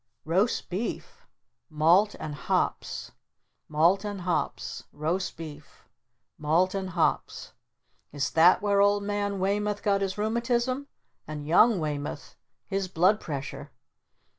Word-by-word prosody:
'Roast 185 +9 +1
Beef'? 195 +6 -5 0.4
'Malt 170 +7 +4
and 150 - -5
Hops'? 145 - -2 0.6
'Malt 170 +6 +3
and 205 -2 -4
Hops'? 175 -1 -2
'Roast 170 +5 -2
Beef'? 150 -3 -11 0.5
'Malt 165 +5 +2
and 190 -1 -3
Hops'? 170 -2 -1 0.6
Is 140 -2 -2
that 170 +4 +5
where 200 -1 +3
Old 205 0 +3
Man 205 0 -1
Weymoth 205 +2 -1
got 200 -1 +2
his 195 0 -2
rheumatism? 240 +5 0 0.4
And 150 -1 -6
Young 210 +8 +5
Weymoth 145 -3 -4 0.3
his 195 -1 -2
blood 185 +4 +3
pressure? 140 -3 -6
185 Hz, 115 wpm, -27 LUFS, 155-205 Hz, 0.6 s, that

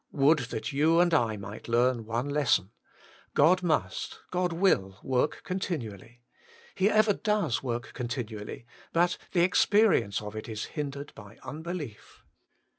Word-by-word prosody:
Would 150 +2 +4
that 110 - -4
you 160 +4 +4
and 175 -1 +4
I 115 -8 +2
might 100 +1 -8
learn 120 0 +2
one 120 +4 -1
lesson: 135 -9 +1 0.6
God 175 +6 +5
must, 170 -4 -1
God 180 -1 0
will 135 - +1
work 130 +3 0
continually. 120 - -5 0.5
He 195 +1 +2
ever 215 -1 +4
does 210 - 0
work 120 -2 -4
continually, 120 -3 -5 0.3
but 175 +1 +2
the 175 - +3
experience 185 - +3
of 105 0 -8
it 110 +2 -6
is 110 -1 -4
hindered 145 -2 -5
by 105 +1 -13
unbelief. 155 - -7
140 Hz, 135 wpm, -28 LUFS, 115-175 Hz, 0.6 s, God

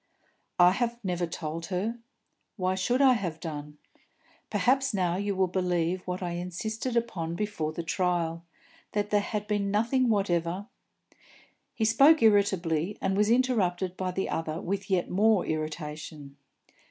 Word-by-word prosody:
"I 180 0 +7
have 235 +3 -1
never 180 -2 -1
told 165 0 -5
her. 205 +6 -2 0.6
Why 185 -2 0
should 245 +8 +1
I 265 -2 +7
have 180 -8 -3
done? 150 -2 -7 0.7
Perhaps 270 -1 +2
now 180 -3 +1
you 200 +1 -1
will 190 0 +3
believe 180 -1 0
what 180 +1 -3
I 175 - -2
insisted 215 +8 -3
upon 170 -8 -2
before 205 -6 -2
the 170 +2 -5
trial, 170 -1 -1 0.5
that 205 0 -1
there 205 -1 +4
had 210 0 -3
been 205 -1 -1
nothing 235 +5 +2
whatever 185 -2 0 0.5
" - - -28
He 220 - 0
spoke 275 +6 +6
irritably, 195 -4 +2
and 195 - 0
was 210 +1 +2
interrupted 200 -8 +1
by 185 0 -2
the 190 +1 -2
other 160 0 -3
with 195 +2 -3
yet 185 -2 +1
more 210 0 +3
irritation. 155 -2 -5
185 Hz, 150 wpm, -28 LUFS, 170-210 Hz, 0.7 s, I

